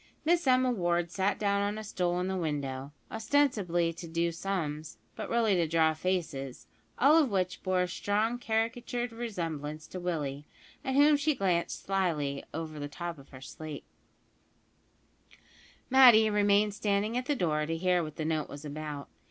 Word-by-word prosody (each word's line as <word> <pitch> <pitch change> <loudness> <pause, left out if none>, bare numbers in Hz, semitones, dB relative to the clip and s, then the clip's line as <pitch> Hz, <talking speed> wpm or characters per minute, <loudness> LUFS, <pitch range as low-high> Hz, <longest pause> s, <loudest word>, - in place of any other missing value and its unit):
Miss 345 -2 +2
Emma 255 0 +4
Ward 175 -5 0
sat 190 +2 0
down 200 -1 +1
on 205 +1 -1
a 215 - -5
stool 180 -3 -1
in 180 - -1
the 190 - -1
window, 140 -5 -3 0.2
ostensibly 220 -9 +1
to 170 +1 -9
"do 170 +1 0
sums," 160 -4 -4 0.2
but - - -6
really 230 -3 +2
to 170 -3 +2
draw 160 0 +3
faces, 155 -7 -3 0.3
all 300 +5 +6
of 280 - +1
which 185 -3 -1
bore 185 -1 +1
a - - -1
strong 215 +6 -1
caricatured 235 +2 -1
resemblance 165 -10 -4
to 185 - -7
Willie, 150 -5 -3 0.4
at 265 -2 -1
whom 290 +1 +6
she 290 +1 +1
glanced 180 -7 0
slyly 160 -8 -1
over 155 -1 -5
the 145 - -4
top 170 +1 -6
of 140 - -16
her 130 -2 -12
slate. 155 +1 -8 2.1
Matty 240 -5 +8
remained 205 0 +3
standing 205 +2 0
at 250 +1 -2
the 290 - +1
door 150 - 0
to 165 0 -2
hear 180 +1 +2
what 155 -2 -6
the 155 - -3
note 155 -2 -1
was 145 +1 -9
about. 150 -1 -6
180 Hz, 170 wpm, -30 LUFS, 155-220 Hz, 2.1 s, Matty